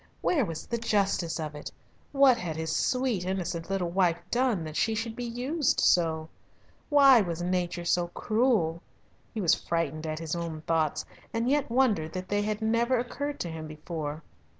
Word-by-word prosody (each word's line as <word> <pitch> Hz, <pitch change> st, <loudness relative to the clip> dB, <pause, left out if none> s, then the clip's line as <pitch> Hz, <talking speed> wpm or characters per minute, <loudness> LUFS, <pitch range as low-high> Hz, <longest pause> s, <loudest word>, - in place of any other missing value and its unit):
Where 300 Hz, -7 st, +2 dB
was 165 Hz, -4 st, -6 dB
the 235 Hz, -, -3 dB
justice 200 Hz, -7 st, 0 dB
of 155 Hz, -2 st, -4 dB
it? 150 Hz, -, -7 dB, 0.4 s
What 275 Hz, -3 st, +6 dB
had 175 Hz, -9 st, -4 dB
his 160 Hz, 0 st, -2 dB
sweet, 250 Hz, -7 st, 0 dB
innocent 180 Hz, -2 st, -3 dB
little 185 Hz, -3 st, -1 dB
wife 175 Hz, -2 st, +2 dB
done 240 Hz, -8 st, +1 dB
that 155 Hz, -1 st, -7 dB
she 220 Hz, +4 st, +1 dB
should 225 Hz, +1 st, -3 dB
be 245 Hz, -, -5 dB
used 255 Hz, +6 st, 0 dB
so? 160 Hz, -2 st, +3 dB, 0.6 s
Why 275 Hz, -5 st, +7 dB
was 175 Hz, -3 st, -3 dB
nature 175 Hz, -1 st, -1 dB
so 175 Hz, 0 st, +2 dB
cruel? 215 Hz, -5 st, +1 dB, 0.5 s
He 220 Hz, -, -4 dB
was 170 Hz, -3 st, +4 dB
frightened 160 Hz, -2 st, -2 dB
at 155 Hz, 0 st, -3 dB
his 160 Hz, 0 st, -3 dB
own 165 Hz, -2 st, -4 dB
thoughts, 160 Hz, -2 st, 0 dB, 0.3 s
and 230 Hz, +1 st, 0 dB
yet 285 Hz, 0 st, +1 dB
wondered 230 Hz, -11 st, +2 dB
that 185 Hz, 0 st, -5 dB
they 205 Hz, 0 st, +1 dB
had 210 Hz, +1 st, -2 dB
never 235 Hz, +3 st, +2 dB
occurred 285 Hz, +4 st, -3 dB
to 175 Hz, -, -3 dB
him 160 Hz, -1 st, -6 dB
before. 155 Hz, 0 st, -6 dB
185 Hz, 175 wpm, -28 LUFS, 165-235 Hz, 0.6 s, Why